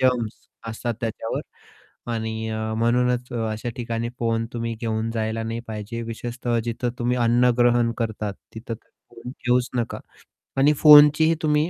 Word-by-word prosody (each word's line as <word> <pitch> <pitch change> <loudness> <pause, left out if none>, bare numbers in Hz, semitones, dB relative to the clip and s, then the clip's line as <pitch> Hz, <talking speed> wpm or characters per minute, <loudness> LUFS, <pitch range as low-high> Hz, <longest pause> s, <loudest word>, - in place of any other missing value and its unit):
Germs 125 -4 +1 0.3
असतात 115 +1 -3
त्याच्यावर. 115 -1 -3 0.7
आणि 110 0 -3
अ, 110 0 -3
म्हणूनच 125 +2 +1 0.2
अशा 110 +2 -4
ठिकाणी 115 -1 -3
फोन 115 -1 0
तुम्ही 115 -1 -3
घेऊन 110 -1 -1
जायला 110 0 -1
नाही 115 +1 -3
पाहिजे. 110 +2 -5
विशेषतः 120 +1 -3
जिथं 120 +1 -2
तुम्ही 125 +1 0
अन्नग्रहण 120 0 +3
करतात 110 -3 -2 0.2
तिथं 115 +1 -5
तर 110 - -18 0.2
फोन 115 +2 -9
घेऊच 125 +1 +2
नका 120 -2 -2 0.6
आणि 145 +3 +5
फोनचीही 150 +2 +7
तुम्ही 150 +1 +2
115 Hz, 140 wpm, -23 LUFS, 115-125 Hz, 0.7 s, फोनचीही